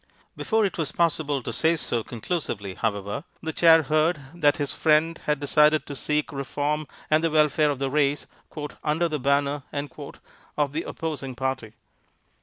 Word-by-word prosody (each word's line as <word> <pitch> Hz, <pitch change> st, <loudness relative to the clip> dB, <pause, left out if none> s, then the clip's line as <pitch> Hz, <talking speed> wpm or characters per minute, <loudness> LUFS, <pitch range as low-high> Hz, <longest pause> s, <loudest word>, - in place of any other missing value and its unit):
Before 220 Hz, -1 st, +1 dB
it 190 Hz, -, -3 dB
was 155 Hz, -2 st, -1 dB
possible 150 Hz, -5 st, 0 dB
to -, -, -4 dB
say 165 Hz, +1 st, +2 dB
so 120 Hz, -7 st, -1 dB
conclusively, 115 Hz, -, -4 dB
however, 100 Hz, +4 st, -2 dB, 0.2 s
the 160 Hz, 0 st, -3 dB
Chair 165 Hz, -1 st, +6 dB
heard 155 Hz, +3 st, +2 dB
that 145 Hz, -4 st, +3 dB
his 145 Hz, -2 st, -2 dB
friend 160 Hz, +2 st, +2 dB
had 150 Hz, -1 st, +1 dB
decided 150 Hz, +2 st, +3 dB
to 140 Hz, -, -7 dB
seek 150 Hz, +3 st, -1 dB
reform 145 Hz, +2 st, -2 dB, 0.2 s
and 155 Hz, +1 st, +4 dB
the 165 Hz, -, +3 dB
welfare 150 Hz, -1 st, +3 dB
of 145 Hz, -, -1 dB
the 135 Hz, 0 st, -2 dB
race 145 Hz, 0 st, +1 dB, 0.6 s
"under 160 Hz, +3 st, +1 dB
the 155 Hz, -2 st, -3 dB
banner" 140 Hz, +2 st, +1 dB, 1.0 s
of 145 Hz, -2 st, +1 dB
the 160 Hz, -, -1 dB
opposing 145 Hz, -5 st, -4 dB
party. 130 Hz, -4 st, -3 dB
150 Hz, 160 wpm, -25 LUFS, 140-160 Hz, 1.0 s, Chair